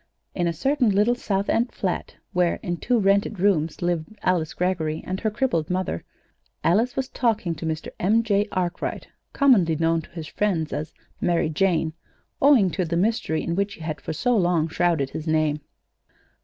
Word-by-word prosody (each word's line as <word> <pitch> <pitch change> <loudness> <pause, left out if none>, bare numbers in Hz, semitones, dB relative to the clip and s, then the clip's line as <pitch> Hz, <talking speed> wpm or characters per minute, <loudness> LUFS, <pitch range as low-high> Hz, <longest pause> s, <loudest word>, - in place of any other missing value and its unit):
In 175 -2 0
a - - +1
certain 250 - +1
little 210 +4 +3
South 200 -4 -2
End 235 +2 +1
flat 185 -3 -3 0.2
where, 180 -1 +2
in 175 -1 -2
two 245 +6 +1
rented 200 0 +2
rooms, 170 -5 +1
lived 175 -2 0 0.2
Alice 175 -4 0
Greggory 165 -4 -1
and 185 +1 -3
her 220 - 0
crippled 210 - -1
mother, 180 - -2 0.6
Alice 225 +9 +2
was 265 -1 -1
talking 220 -10 0
to 160 +1 -5
Mr. 160 0 -3
M. 220 +5 +3
J. 205 -1 +1
Arkwright, 180 -1 -3 0.2
commonly 210 - +4
known 165 +1 +1
to - - -16
his 165 -2 -7
friends 170 -4 -1
as 155 +1 -4 0.3
"Mary 170 -3 +1
Jane," 160 -1 +1 0.5
owing 260 -10 +5
to 185 - -1
the 170 0 -1
mystery 185 -5 0
in 170 - -2
which 200 +2 -1
he - - -15
had 155 -1 -4
for - - -4
so 245 +9 +1
long 175 -5 +2
shrouded 165 -4 0
his 155 - -6
name. 155 -1 +1
180 Hz, 180 wpm, -24 LUFS, 160-205 Hz, 0.6 s, owing